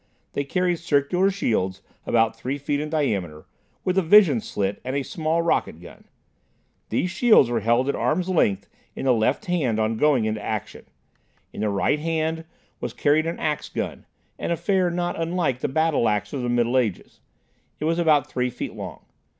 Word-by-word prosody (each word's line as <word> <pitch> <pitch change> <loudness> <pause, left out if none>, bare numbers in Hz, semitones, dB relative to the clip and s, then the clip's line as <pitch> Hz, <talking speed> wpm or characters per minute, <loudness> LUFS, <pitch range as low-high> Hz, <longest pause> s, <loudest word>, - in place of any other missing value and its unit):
They 140 - -1
carried 180 +4 0
circular 165 +4 +1
shields, 95 - -1 0.2
about 115 -1 +2
three 135 +3 -4
feet 145 0 -2
in 150 +1 -3
diameter, 100 - -2 0.4
with 185 +1 +2
a - - +2
vision 170 - +6
slit 100 -1 -3
and 130 +1 -3
a 140 - 0
small 160 +1 -1
rocket 160 - 0
gun. 90 - -14 0.8
These 180 - 0
shields 200 - +5
were 120 - +1
held 120 +4 +2
at 140 - +1
arm's 175 +4 0
length 155 - +1 0.3
in - - -5
the 130 - +5
left 110 -2 0
hand 145 -12 0
on 110 +1 0
going 140 -4 +3
into 110 -1 -2
action. 110 -2 -5 0.7
In - - -6
the 105 - +1
right 100 +9 +1
hand 160 0 -2 0.3
was - - -4
carried 155 +2 +2
an 165 - -3
ax 150 -1 -2
gun, - - -5 0.3
an - - -3
affair 185 +1 +1
not 175 -1 -2
unlike 165 -6 0
the - - -1
battle 155 -4 +1
ax 105 +5 -2
of 135 - -2
the 120 - -2
Middle 120 +1 +2
Ages. 110 -7 -3 0.6
It 150 - -2
was 165 +2 +1
about 155 -4 +4
three 125 0 -1
feet - - -6
long. - - -8
145 Hz, 185 wpm, -24 LUFS, 115-165 Hz, 0.8 s, vision